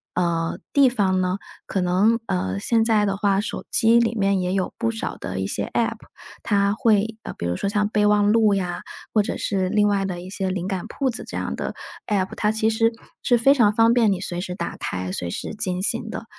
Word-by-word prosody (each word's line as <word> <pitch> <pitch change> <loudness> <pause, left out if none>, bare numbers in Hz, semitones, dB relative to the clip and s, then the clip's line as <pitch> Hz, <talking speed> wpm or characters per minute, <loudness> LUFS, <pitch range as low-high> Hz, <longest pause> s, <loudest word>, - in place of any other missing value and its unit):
呃， 170 -2 0
地 280 -2 +6
方 190 -6 +1
呢， 185 +1 0 0.3
可 195 - -2
能 190 +6 +3
呃， 95 - -2
现 225 - +2
在 215 -2 +3
的 195 - 0
话 195 -1 +1
手 210 - -4
机 230 0 +5
里 230 -1 +1
面 195 -3 +1
也 180 0 -1
有 190 -1 -1
不 230 -1 0
少 225 - -4
的 - - -5
一 - - -1
些 - - -3
app， - - 0 0.5
它 200 -1 +2
会 220 0 +1
呃， - - -6
比 85 - -4
如 85 0 -1
说 200 - -2
像 210 0 +1
备 210 -1 +1
忘 210 0 +4
录 220 -3 +4
呀， 180 -3 -2 0.3
或 210 -2 +4
者 - - -3
是 190 -2 -1
另 210 0 +3
外 200 -1 +1
的 180 -2 -3
一 180 - -9
些 190 -1 -2
灵 185 0 -3
感 190 -3 -3
铺 270 -2 -1
子 245 - -4
这 - - -6
样 - - -3
的 - - -4 0.3
app， 195 -3 -1
它 210 - +1
其 220 0 +1
实 225 +1 +2 0.3
是 245 -2 +4
非 270 +4 +5
常 230 -7 +4
方 225 +2 +4
便 230 -4 +4
你 185 - -1
随 175 -2 -3
时 180 -1 -5
打 170 - -4
开、 90 0 -4
随 90 -2 -3
时 100 - -5
进 185 -4 -2
行 225 +2 0
的。 230 - -6
205 Hz, 265 characters per minute, -23 LUFS, 185-225 Hz, 0.5 s, 地